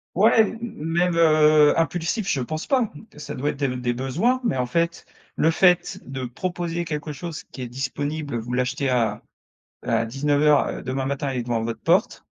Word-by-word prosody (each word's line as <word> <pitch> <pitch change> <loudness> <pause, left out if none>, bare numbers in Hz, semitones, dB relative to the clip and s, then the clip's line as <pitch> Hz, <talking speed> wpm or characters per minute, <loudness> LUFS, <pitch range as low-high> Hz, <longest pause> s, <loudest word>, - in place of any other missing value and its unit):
Ouais 220 +5 +5
m 220 +1 -1
même, 175 -4 -1
heu, 155 -2 +5
impulsif 170 +5 -1
je 135 - 0
pense 155 +6 -4
pas, 255 -6 +1 0.2
ça 150 - -7
doit 145 +3 -1
être - - -11
des 135 -3 -1
des 120 -1 -1
besoins. 165 - 0
Mais 180 - 0
en 125 - 0
fait, 170 +6 -1 0.3
le 160 - +3
fait 180 +1 +3
de 130 0 -5
proposer 175 +5 -3
quelque 150 -1 -4
chose 165 +2 -7
qui 130 - -7
est 120 - -5
disponible, 140 +1 -3
vous 115 +2 -6
l'achetez 130 +3 0
à 115 -5 0 0.6
à 115 - +1
19:00, 145 +3 +2
heu, - - -5
demain 130 +1 -3
matin 140 +1 -2
et 130 - -4
il - - -1
est - - -5
devant 115 -1 -1
votre 115 0 -4
porte. - - +1
150 Hz, 195 wpm, -23 LUFS, 130-170 Hz, 0.6 s, Ouais